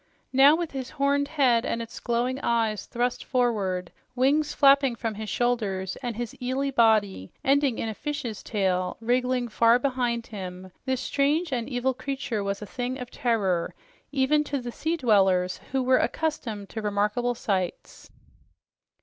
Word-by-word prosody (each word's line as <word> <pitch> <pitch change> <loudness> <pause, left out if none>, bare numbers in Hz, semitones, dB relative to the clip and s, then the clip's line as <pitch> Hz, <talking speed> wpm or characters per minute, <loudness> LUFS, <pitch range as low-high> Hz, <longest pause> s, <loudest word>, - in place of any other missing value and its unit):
Now, 275 +3 +7
with 340 -1 -3
his 260 -2 -5
horned 280 +1 +1
head 260 -6 +3
and 230 - -2
its 230 -1 -7
glowing 245 +2 -1
eyes 225 -5 0
thrust 245 0 -1
forward, 205 -8 0 0.2
wings 285 +4 +2
flapping 275 -3 +5
from 225 -1 -3
his 215 0 -6
shoulders 205 -6 -1
and 240 -3 -4
his 240 0 -4
eely 265 +2 -1
body 215 - +2
ending 275 -3 +2
in - - -2
a 220 - -3
fish's 270 -4 -4
tail 185 -4 -1
wriggling 250 +1 0
far 230 +1 +4
behind 245 -3 -1
him, 185 -2 -8
this 260 -1 -1
strange 295 +3 +1
and 240 -1 -2
evil 260 0 0
creature 255 -5 -3
was 200 +1 -3
a - - -5
thing 250 +4 -4
of 250 -1 -7
terror 200 -9 0 0.4
even 285 +2 +2
to 285 -1 -2
the 240 -1 -6
sea 325 +7 -2
dwellers, 190 - +3
who 265 -1 +1
were 255 0 +4
accustomed 230 -11 -2
to 220 - -5
remarkable 210 +4 0
sights. 190 -5 -3
240 Hz, 160 wpm, -26 LUFS, 210-265 Hz, 0.4 s, Now